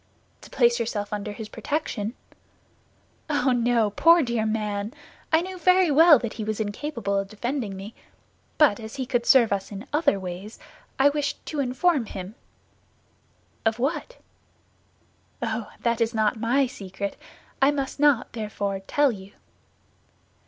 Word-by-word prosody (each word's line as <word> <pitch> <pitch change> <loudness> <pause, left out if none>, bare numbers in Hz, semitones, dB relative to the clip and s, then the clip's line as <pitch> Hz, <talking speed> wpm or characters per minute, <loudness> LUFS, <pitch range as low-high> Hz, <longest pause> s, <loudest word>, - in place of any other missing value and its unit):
"To - - -13
place 240 -1 +3
yourself 210 -3 -3
under 210 0 -3
his 215 +1 -7
protection?" 240 -5 -3 1.1
"Oh, 280 -3 +2
no, 235 -3 +2
poor 335 +9 +5
dear 235 -3 -1
man! 210 +1 -2 0.4
I 320 +1 +5
knew 370 0 -7
very 365 -1 +4
well 315 +1 +8
that 235 -2 -4
he 220 - -5
was 215 0 -3
incapable 215 -1 -2
of 195 - -3
defending 220 -2 -3
me; 200 +4 -8 0.6
but 290 -9 +4
as 220 -1 -8
he 265 -2 -3
could 245 -2 -1
serve 235 -6 +6
us 195 +1 -3
in 200 +3 -7
other 295 -10 +2
ways, 185 +3 -7 0.4
I 275 +2 +5
wished 290 0 -3
to 305 - -4
inform 270 0 +1
him." 190 0 -7 1.3
"Of 225 0 +1
what?" 300 - -2 1.2
"Oh, 225 -2 -3
that 235 0 0
is 230 0 +1
not 215 +1 +2
my 240 +5 +2
secret; 200 -4 -6 0.5
I 270 - +6
must 275 -1 -2
not, 285 -5 +3
therefore, 205 -3 -3
tell 290 -2 +3
you." 195 -2 -10
235 Hz, 145 wpm, -25 LUFS, 210-280 Hz, 1.3 s, well